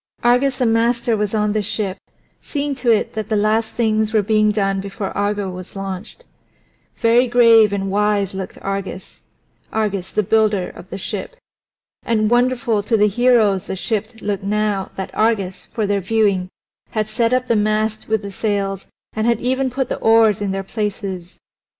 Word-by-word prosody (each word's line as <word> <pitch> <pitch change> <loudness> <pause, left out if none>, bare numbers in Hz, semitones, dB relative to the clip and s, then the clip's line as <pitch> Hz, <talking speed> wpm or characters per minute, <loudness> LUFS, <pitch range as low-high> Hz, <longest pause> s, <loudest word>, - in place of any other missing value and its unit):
Argus 250 +3 +3
the 255 - +1
master 230 +1 +2
was 210 0 -1
on 210 -1 +1
the 215 - +1
ship, 200 -2 -2 0.5
seeing 290 -1 -2
to 255 -2 -2
it 220 -2 +2
that 215 -1 -4
the 220 - +1
last 220 +2 +1
things 220 -2 +1
were 215 -2 +3
being 215 +1 +3
done 195 -2 0
before 195 0 -5
Argo 205 0 -1
was 180 +1 -9
launched. 195 - -6 0.7
Very 235 +2 +4
grave 230 -3 +6
and 195 -1 -2
wise 205 -1 +1
looked 190 -1 -6
Argus 195 -1 -5 0.5
Argus 200 -4 -2
the 215 - +1
builder 210 -2 +2
of - - -13
the - - -5
ship. - - -5 0.7
And 215 -1 0
wonderful 245 -2 +2
to 225 +2 +1
the 210 0 +4
heroes 215 -3 +3
the - - -3
ship 215 +2 -2
looked 200 -2 -2
now 205 -1 -1
that 190 - -5
Argus, 200 -4 0
for 220 - -2
their 200 0 0
viewing, 195 -2 +1 0.4
had 215 -1 -1
set 230 +2 0
up 255 0 +1
the 235 - +2
mast 215 +1 0
with 220 -1 0
the 200 - -6
sails 195 -1 -2 0.3
and 220 +1 -1
had 235 -2 +2
even 260 +2 0
put 265 0 -2
the - - -4
oars 225 -2 +4
in 205 - -1
their 195 0 -2
places. 195 -3 -4
215 Hz, 175 wpm, -19 LUFS, 200-230 Hz, 0.7 s, grave